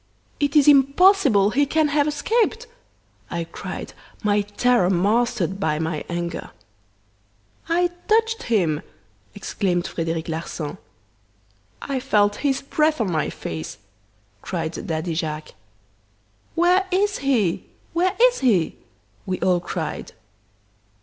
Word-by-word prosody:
"'It 285 Hz, -1 st, 0 dB
is 295 Hz, -2 st, +6 dB
impossible 275 Hz, -, +5 dB
he 285 Hz, +5 st, +3 dB
can 310 Hz, +1 st, +2 dB
have 290 Hz, 0 st, +2 dB
escaped!' 445 Hz, +9 st, 0 dB, 0.6 s
I 170 Hz, -1 st, -2 dB
cried, 165 Hz, -, -7 dB, 0.3 s
my 205 Hz, 0 st, +3 dB
terror 205 Hz, -1 st, +2 dB
mastered 195 Hz, 0 st, +1 dB
by 155 Hz, -5 st, 0 dB
my 160 Hz, -1 st, -2 dB
anger. 170 Hz, -1 st, -4 dB, 1.2 s
"'I 350 Hz, +1 st, +2 dB, 0.2 s
touched 450 Hz, +1 st, +2 dB
him!' 170 Hz, -9 st, +2 dB, 0.5 s
exclaimed 180 Hz, -3 st, -1 dB
Frederic 165 Hz, -2 st, -3 dB
Larsan. 160 Hz, -2 st, -5 dB, 1.0 s
"'I 275 Hz, -2 st, -2 dB
felt 210 Hz, -5 st, +2 dB
his 275 Hz, -2 st, 0 dB
breath 305 Hz, +2 st, +1 dB
on 210 Hz, -5 st, 0 dB
my 155 Hz, -2 st, 0 dB
face!' 80 Hz, -1 st, -6 dB, 0.6 s
cried 160 Hz, +1 st, -4 dB
Daddy 160 Hz, +1 st, -2 dB
Jacques. 155 Hz, -1 st, -4 dB, 1.0 s
"'Where 360 Hz, +3 st, +3 dB
is 400 Hz, +2 st, +1 dB
he?' 235 Hz, -11 st, +1 dB, 0.3 s
where 365 Hz, +3 st, +1 dB
is -, -, +5 dB
he?' 205 Hz, -11 st, +2 dB, 0.5 s
we 185 Hz, -1 st, -2 dB
all 180 Hz, -1 st, +3 dB
cried. 175 Hz, -, -5 dB
215 Hz, 115 wpm, -23 LUFS, -, 1.2 s, is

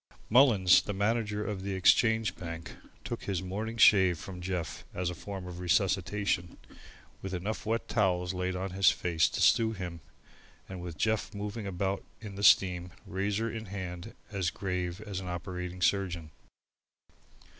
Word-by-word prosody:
Mullins, 110 Hz, -8 st, +6 dB
the 105 Hz, -, -5 dB
manager 105 Hz, 0 st, 0 dB
of 100 Hz, -3 st, -3 dB
the 100 Hz, 0 st, -3 dB
Exchange 110 Hz, +1 st, +3 dB
Bank, 85 Hz, -2 st, -7 dB, 0.3 s
took -, -, -5 dB
his 95 Hz, -3 st, -2 dB
morning 110 Hz, +5 st, -4 dB
shave 95 Hz, -6 st, +6 dB
from 90 Hz, +2 st, -8 dB
Jeff 90 Hz, -3 st, -4 dB
as 90 Hz, -1 st, -1 dB
a -, -, -5 dB
form 95 Hz, +1 st, -7 dB
of 90 Hz, -1 st, -8 dB
resuscitation, 90 Hz, +1 st, 0 dB, 0.6 s
with 95 Hz, -1 st, -4 dB
enough 105 Hz, +4 st, -4 dB
wet 115 Hz, +1 st, -1 dB
towels 90 Hz, -4 st, +1 dB
laid 90 Hz, 0 st, -2 dB
on 95 Hz, +1 st, -3 dB
his 95 Hz, +1 st, +5 dB
face 85 Hz, -3 st, +1 dB
to -, -, -4 dB
stew 115 Hz, -1 st, +4 dB
him 90 Hz, -4 st, -6 dB, 0.7 s
and 95 Hz, -2 st, -7 dB
with 85 Hz, -3 st, -7 dB
Jeff 110 Hz, +1 st, 0 dB
moving 105 Hz, +1 st, -4 dB
about 95 Hz, +1 st, -2 dB, 0.2 s
in 105 Hz, -3 st, -8 dB
the 100 Hz, -, -7 dB
steam, 90 Hz, -3 st, +5 dB, 0.2 s
razor 100 Hz, +4 st, -1 dB
in 110 Hz, -1 st, -6 dB
hand, 95 Hz, +1 st, -6 dB, 0.2 s
as 95 Hz, -4 st, 0 dB
grave 90 Hz, 0 st, -3 dB
as 100 Hz, -3 st, -5 dB
an 95 Hz, -, -7 dB
operating 90 Hz, 0 st, -5 dB
surgeon. 85 Hz, -4 st, 0 dB
95 Hz, 155 wpm, -30 LUFS, 90-105 Hz, 0.7 s, Mullins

